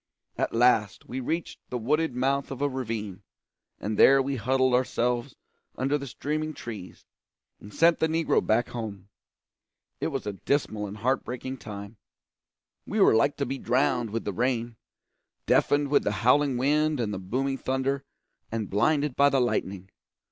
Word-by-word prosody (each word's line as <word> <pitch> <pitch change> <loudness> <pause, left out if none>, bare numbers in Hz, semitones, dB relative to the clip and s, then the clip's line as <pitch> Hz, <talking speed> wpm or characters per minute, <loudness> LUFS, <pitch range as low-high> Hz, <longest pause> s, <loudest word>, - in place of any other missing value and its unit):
At - - -1
last 115 -4 +2
we 130 - -4
reached 160 +6 -3
the 125 - -2
wooded 150 +4 0
mouth 135 +2 0
of 135 - -6
a 145 - +2
ravine, 115 -8 -4 0.6
and 105 0 -3
there 135 +1 +7
we 135 +1 -1
huddled 130 +2 +2
ourselves 125 0 0 0.4
under 135 +3 0
the 140 -1 -3
streaming 155 +4 -3
trees, 105 -6 -9 0.5
and 105 - -12
sent 165 +7 +4
the 160 - +3
negro 160 0 +1
back 115 +2 +1
home. 105 -5 -6 0.9
It - - -1
was - - -4
a 105 - -3
dismal 110 -2 -1
and 100 +2 -8
heart 130 +5 0
breaking 130 +2 -5
time. 105 -1 -9 0.9
We - - -2
were - - +6
like 115 +6 +2
to 140 - -1
be 135 0 -4
drowned 125 -2 +1
with 115 +2 -4
the 100 - -2
rain, 120 +1 -1 0.7
deafened 145 0 +3
with 145 - +3
the - - 0
howling 140 0 +4
wind 150 +3 +2
and 105 -3 -1
the 95 - -4
booming 135 +8 -2
thunder, 135 +1 -1 0.5
and 110 -3 -3
blinded 145 +6 +2
by 140 0 +5
the 135 -1 +2
lightning. 95 -6 -2
125 Hz, 165 wpm, -27 LUFS, 110-140 Hz, 0.9 s, there